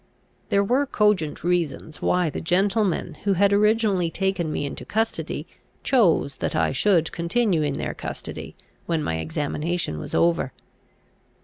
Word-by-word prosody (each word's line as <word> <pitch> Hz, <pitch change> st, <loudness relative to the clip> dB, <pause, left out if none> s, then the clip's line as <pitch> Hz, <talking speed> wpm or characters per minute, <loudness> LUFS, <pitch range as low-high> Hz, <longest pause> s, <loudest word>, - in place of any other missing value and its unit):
There 200 Hz, 0 st, +3 dB
were 260 Hz, +7 st, +1 dB
cogent 210 Hz, -, +1 dB
reasons 165 Hz, -3 st, -1 dB
why 180 Hz, -3 st, +2 dB
the -, -, -5 dB
gentlemen 190 Hz, -1 st, +1 dB
who 200 Hz, -, +2 dB
had 200 Hz, +2 st, +3 dB
originally 210 Hz, -4 st, +3 dB
taken 185 Hz, -3 st, -1 dB
me 145 Hz, -, -2 dB
into 140 Hz, -, -6 dB
custody, 225 Hz, +1 st, -2 dB, 0.4 s
chose 170 Hz, -, +3 dB
that -, -, -2 dB
I -, -, +2 dB
should 165 Hz, +3 st, +2 dB
continue 175 Hz, +1 st, +1 dB
in 145 Hz, -2 st, -1 dB
their -, -, -3 dB
custody -, -, -7 dB, 0.3 s
when 165 Hz, -3 st, 0 dB
my 80 Hz, -, -1 dB
examination 145 Hz, -, -2 dB
was -, -, -5 dB
over. 165 Hz, -6 st, +2 dB
175 Hz, 140 wpm, -24 LUFS, 155-200 Hz, 0.4 s, There